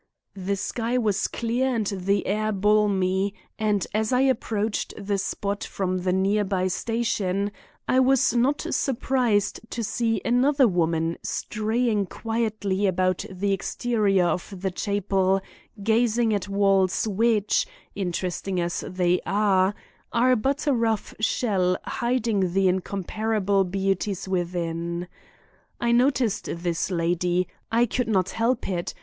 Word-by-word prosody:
The 195 Hz, +1 st, -2 dB
sky 230 Hz, +5 st, -2 dB
was 210 Hz, -4 st, +1 dB
clear 240 Hz, +3 st, -1 dB
and 220 Hz, -2 st, 0 dB
the 195 Hz, 0 st, 0 dB
air 215 Hz, +2 st, 0 dB
balmy, 200 Hz, -1 st, +2 dB, 0.2 s
and 210 Hz, -3 st, +1 dB
as 215 Hz, +2 st, 0 dB
I 250 Hz, 0 st, +3 dB
approached 225 Hz, -5 st, 0 dB
the 200 Hz, 0 st, -2 dB
spot 200 Hz, +1 st, -3 dB
from 185 Hz, -1 st, -2 dB
the 180 Hz, 0 st, 0 dB
near 195 Hz, +3 st, +2 dB
by 190 Hz, -2 st, 0 dB
station 205 Hz, -2 st, -1 dB, 0.4 s
I 255 Hz, -, +3 dB
was 260 Hz, -2 st, +4 dB
not 255 Hz, +5 st, +1 dB
surprised 240 Hz, -5 st, +1 dB
to 235 Hz, -, -3 dB
see 225 Hz, 0 st, 0 dB
another 260 Hz, +3 st, +4 dB
woman 165 Hz, -3 st, 0 dB
straying 215 Hz, -1 st, -1 dB
quietly 215 Hz, -3 st, -1 dB
about 185 Hz, +1 st, +1 dB
the 195 Hz, +1 st, -1 dB
exterior 200 Hz, -1 st, +1 dB
of 175 Hz, +3 st, -1 dB
the 190 Hz, -1 st, -1 dB
chapel 195 Hz, -1 st, +1 dB, 0.4 s
gazing 225 Hz, +1 st, +2 dB
at 205 Hz, -1 st, -2 dB
walls 195 Hz, 0 st, +2 dB
which, 215 Hz, -, +2 dB, 0.3 s
interesting 185 Hz, 0 st, -2 dB
as 175 Hz, 0 st, -2 dB
they 180 Hz, -1 st, +1 dB
are, 200 Hz, -1 st, +2 dB, 0.4 s
are 250 Hz, +2 st, +4 dB
but 270 Hz, +7 st, -1 dB
a 290 Hz, -, +3 dB
rough 225 Hz, -3 st, 0 dB
shell 195 Hz, -5 st, +1 dB
hiding 230 Hz, -7 st, 0 dB
the 195 Hz, 0 st, +3 dB
incomparable 200 Hz, +2 st, 0 dB
beauties 195 Hz, +1 st, -1 dB
within. 170 Hz, -1 st, -2 dB, 0.7 s
I 235 Hz, -, +1 dB
noticed 245 Hz, -2 st, +2 dB
this 170 Hz, 0 st, -2 dB
lady; 175 Hz, 0 st, 0 dB, 0.2 s
I 235 Hz, +1 st, +4 dB
could 245 Hz, +1 st, -1 dB
not 190 Hz, -4 st, +1 dB
help 230 Hz, +2 st, 0 dB
it. 175 Hz, -3 st, -3 dB
200 Hz, 130 wpm, -25 LUFS, 185-225 Hz, 0.7 s, was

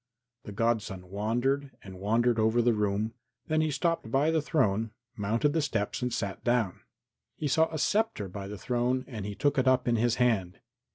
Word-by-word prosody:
The -, -, -7 dB
godson 100 Hz, -4 st, -1 dB
wandered 120 Hz, +7 st, -1 dB
and 95 Hz, -2 st, -10 dB
wandered 115 Hz, +4 st, +2 dB
over 110 Hz, +2 st, +3 dB
the 120 Hz, 0 st, +4 dB
room; 105 Hz, +1 st, 0 dB, 0.3 s
then 155 Hz, 0 st, +1 dB
he 155 Hz, -, +1 dB
stopped 165 Hz, -4 st, -1 dB
by 140 Hz, +6 st, +2 dB
the 160 Hz, -1 st, +2 dB
throne, 115 Hz, -, +1 dB, 0.3 s
mounted 115 Hz, +8 st, +1 dB
the 160 Hz, -, +2 dB
steps 115 Hz, -8 st, -2 dB
and 125 Hz, 0 st, -1 dB
sat 100 Hz, -4 st, -3 dB
down. 120 Hz, -6 st, +1 dB, 0.6 s
He 150 Hz, -, -2 dB
saw 160 Hz, +3 st, +3 dB
a 160 Hz, -, -3 dB
sceptre 205 Hz, -, +1 dB
by 95 Hz, +1 st, -7 dB
the 105 Hz, +1 st, -6 dB
throne 125 Hz, +4 st, 0 dB
and 110 Hz, -6 st, -6 dB
he 100 Hz, -, -5 dB
took 145 Hz, +3 st, +1 dB
it 130 Hz, -, +1 dB
up 130 Hz, -1 st, +3 dB
in 120 Hz, -1 st, +3 dB
his 120 Hz, +1 st, +2 dB
hand. 105 Hz, -7 st, +1 dB
120 Hz, 190 wpm, -29 LUFS, 105-135 Hz, 0.6 s, the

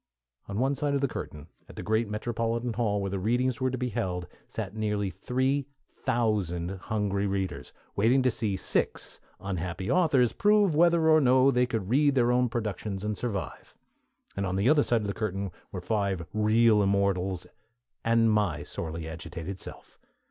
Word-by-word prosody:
On 100 Hz, -, -4 dB
one 135 Hz, +4 st, +2 dB
side 145 Hz, 0 st, -1 dB
of 140 Hz, -, 0 dB
the 140 Hz, -, +2 dB
curtain 75 Hz, -, -7 dB, 0.2 s
at -, -, -12 dB
the -, -, -6 dB
great 110 Hz, 0 st, +1 dB
metropolitan 115 Hz, +2 st, -2 dB
hall 105 Hz, -3 st, 0 dB
where 100 Hz, -1 st, -2 dB
the 100 Hz, -, -2 dB
Readings 120 Hz, +5 st, 0 dB
were 130 Hz, -, +2 dB
to 130 Hz, -, -3 dB
be 125 Hz, 0 st, -2 dB
held 95 Hz, -6 st, -2 dB, 0.2 s
sat 105 Hz, -2 st, -5 dB
nearly 105 Hz, -2 st, -1 dB
three 130 Hz, +8 st, -1 dB, 0.3 s
thousand 95 Hz, -7 st, -1 dB
hungry 100 Hz, -2 st, 0 dB
readers, 95 Hz, -1 st, -3 dB, 0.2 s
waiting 120 Hz, +6 st, +3 dB
to 130 Hz, -, +3 dB
see 105 Hz, -4 st, -1 dB
six -, -, -1 dB, 0.2 s
unhappy 90 Hz, -1 st, -3 dB
authors 145 Hz, -, +3 dB
prove 205 Hz, -4 st, +3 dB
whether 170 Hz, +1 st, +4 dB
or 155 Hz, -1 st, +6 dB
no 130 Hz, +1 st, +5 dB
they 125 Hz, -1 st, +2 dB
could 110 Hz, -6 st, -2 dB
read 145 Hz, +1 st, +4 dB
their 120 Hz, -2 st, +3 dB
own 125 Hz, 0 st, +2 dB
productions 105 Hz, -3 st, -3 dB
and 105 Hz, 0 st, -1 dB
survive; 100 Hz, -4 st, -5 dB, 0.6 s
and 100 Hz, 0 st, -1 dB
on 90 Hz, -, -2 dB
the 100 Hz, +4 st, +1 dB
other 150 Hz, +1 st, +5 dB
side 120 Hz, -4 st, +1 dB
of 105 Hz, -, -3 dB
the 100 Hz, -, -2 dB
curtain 100 Hz, -3 st, -3 dB, 0.2 s
were 90 Hz, -, -5 dB
five 100 Hz, -3 st, -1 dB
real 110 Hz, 0 st, +4 dB
Immortals 95 Hz, -2 st, +1 dB, 0.6 s
and 115 Hz, -1 st, +3 dB
my 95 Hz, -9 st, +1 dB
sorely 80 Hz, 0 st, -5 dB
agitated 80 Hz, +3 st, -6 dB
self. -, -, -10 dB
110 Hz, 175 wpm, -28 LUFS, 95-125 Hz, 0.6 s, or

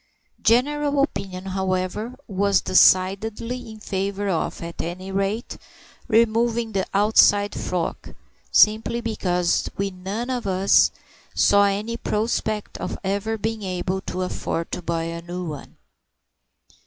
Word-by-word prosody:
General 285 Hz, +5 st, +2 dB
opinion, 190 Hz, -9 st, -4 dB
however, 190 Hz, +4 st, -2 dB
was 200 Hz, -1 st, +2 dB
decidedly 210 Hz, +6 st, +2 dB
in 220 Hz, 0 st, -10 dB
favour 200 Hz, 0 st, -2 dB
of, 170 Hz, -1 st, -2 dB
at 170 Hz, 0 st, -5 dB
any 185 Hz, +3 st, -5 dB
rate, 195 Hz, +4 st, -2 dB, 0.5 s
removing 230 Hz, 0 st, +2 dB
the 195 Hz, -2 st, -1 dB
outside 205 Hz, 0 st, +4 dB
frock, 175 Hz, -2 st, -4 dB, 0.4 s
simply 220 Hz, +2 st, +4 dB
because 180 Hz, -6 st, 0 dB
we 200 Hz, 0 st, -1 dB
none 195 Hz, +7 st, -4 dB
of 245 Hz, -5 st, -3 dB
us 190 Hz, +1 st, +4 dB, 0.5 s
saw 200 Hz, 0 st, +5 dB
any 210 Hz, +4 st, -1 dB
prospect 215 Hz, -1 st, -2 dB
of -, -, -4 dB
ever 200 Hz, +3 st, -1 dB
being 220 Hz, +1 st, -3 dB
able 185 Hz, 0 st, -2 dB
to 185 Hz, 0 st, -4 dB
afford 170 Hz, -2 st, -3 dB
to -, -, -3 dB
buy 165 Hz, -1 st, -2 dB
a 165 Hz, 0 st, -5 dB
new 175 Hz, +1 st, -5 dB
one. 150 Hz, -4 st, -8 dB
200 Hz, 125 wpm, -23 LUFS, 185-220 Hz, 0.5 s, saw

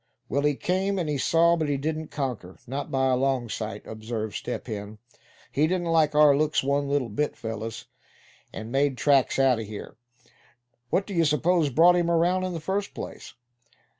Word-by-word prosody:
"Well, 140 Hz, +4 st, +1 dB
he 145 Hz, 0 st, +2 dB
came, 190 Hz, +5 st, -1 dB
and 175 Hz, -4 st, -1 dB
he 145 Hz, -2 st, -1 dB
saw; 170 Hz, +4 st, +4 dB
but 160 Hz, -3 st, -1 dB
he 140 Hz, -, +1 dB
didn't 155 Hz, +2 st, -3 dB
conquer, 125 Hz, -10 st, -4 dB
not 135 Hz, +3 st, -4 dB
by 130 Hz, -1 st, +1 dB
a 130 Hz, -, +3 dB
long 130 Hz, -2 st, 0 dB
sight," 105 Hz, -1 st, -5 dB
observed 110 Hz, -1 st, -5 dB
Step 125 Hz, -, -5 dB
Hen. 105 Hz, -2 st, -6 dB, 0.5 s
"He 150 Hz, +3 st, +2 dB
didn't 175 Hz, -1 st, -1 dB
like 155 Hz, -2 st, +3 dB
our 150 Hz, -2 st, +6 dB
looks 155 Hz, 0 st, +1 dB
one 140 Hz, +1 st, 0 dB
little 140 Hz, -3 st, +1 dB
bit, 130 Hz, +8 st, -2 dB
fellows, 110 Hz, 0 st, -6 dB, 0.7 s
and 110 Hz, +1 st, -7 dB
made 135 Hz, 0 st, +1 dB
tracks 140 Hz, -2 st, +3 dB
out 135 Hz, -3 st, +3 dB
of 110 Hz, -, -5 dB
here. 105 Hz, +1 st, -9 dB, 0.9 s
What 195 Hz, -, +1 dB
d'ye 185 Hz, -5 st, 0 dB
s'pose 160 Hz, +1 st, +2 dB
brought 170 Hz, +7 st, +5 dB
him 175 Hz, -1 st, +1 dB
around, 175 Hz, +2 st, +2 dB
in 185 Hz, -, -3 dB
the 165 Hz, -, -4 dB
first 195 Hz, +5 st, -3 dB
place?" -, -, -8 dB
145 Hz, 185 wpm, -26 LUFS, 125-165 Hz, 0.9 s, our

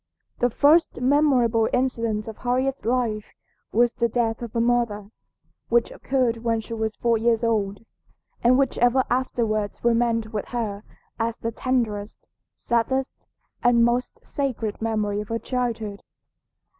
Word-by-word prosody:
The 245 Hz, -, +3 dB
first 300 Hz, +7 st, +3 dB
memorable 250 Hz, -5 st, +3 dB
incident 230 Hz, -4 st, -1 dB
of 220 Hz, -, -7 dB
Harriet's 260 Hz, +1 st, -1 dB
life 230 Hz, -3 st, -1 dB, 0.4 s
was 240 Hz, +2 st, +3 dB
the 235 Hz, -1 st, 0 dB
death 230 Hz, -1 st, -1 dB
of 235 Hz, -2 st, -6 dB
her 230 Hz, -, 0 dB
mother, 230 Hz, -4 st, 0 dB, 0.6 s
which 235 Hz, 0 st, +2 dB
occurred 250 Hz, -3 st, 0 dB
when 230 Hz, 0 st, 0 dB
she 220 Hz, +1 st, -7 dB
was 220 Hz, -1 st, -2 dB
four 230 Hz, -2 st, +1 dB
years 230 Hz, 0 st, +2 dB
old, 215 Hz, -2 st, -1 dB, 0.6 s
and 245 Hz, +2 st, +5 dB
which 270 Hz, -2 st, +1 dB
ever 245 Hz, +2 st, +4 dB
afterwards 225 Hz, -5 st, -1 dB
remained 230 Hz, -1 st, +1 dB
with 210 Hz, -, -2 dB
her 215 Hz, -4 st, -3 dB, 0.4 s
as 230 Hz, 0 st, -1 dB
the 230 Hz, -, -3 dB
tenderest, 225 Hz, -4 st, -2 dB, 0.3 s
saddest, 255 Hz, +3 st, -1 dB, 0.3 s
and 235 Hz, -1 st, +4 dB
most 240 Hz, +1 st, -1 dB
sacred 245 Hz, -8 st, -3 dB
memory 210 Hz, -2 st, -1 dB
of 210 Hz, -, -8 dB
her 230 Hz, -, -1 dB
childhood. 230 Hz, -5 st, -3 dB
235 Hz, 140 wpm, -24 LUFS, 220-245 Hz, 0.6 s, and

